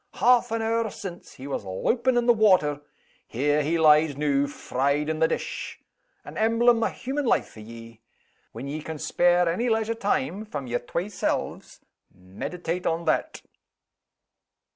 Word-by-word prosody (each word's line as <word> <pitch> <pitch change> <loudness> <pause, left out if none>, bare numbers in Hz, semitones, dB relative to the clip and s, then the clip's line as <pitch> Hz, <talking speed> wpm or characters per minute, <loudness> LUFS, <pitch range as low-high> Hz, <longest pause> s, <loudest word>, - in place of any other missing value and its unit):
"Half 245 0 +4
an 225 0 -2
hour 225 0 0
since, 190 -4 -9
he 130 - -11
was 140 -6 -4
loupin' 235 - 0
in 240 - +2
the 240 - +6
water. 185 -10 +3 0.5
There 145 +5 +1
he 160 +3 0
lies 155 -2 +4
noo, 145 -1 +1
fried 140 +2 -1
in 160 0 -2
the 160 - +4
dish. - - -4 0.5
An - - -7
emblem 230 +1 +3
o' - - +3
human 275 +3 -4
life - - +1
for - - -14
ye! 115 +1 -12 0.5
When 120 +5 -7
ye 150 +2 -4
can 160 0 -6
spare 175 +3 +2
any 225 +9 0
leisure 225 0 +1
time 220 0 -1
from 145 -11 -6
yer 120 0 -2
twa 170 +9 -4
selves, 210 - -3 0.3
meditate 165 - -5
on 165 +1 -1
that." - - -1
170 Hz, 160 wpm, -25 LUFS, 140-225 Hz, 0.5 s, the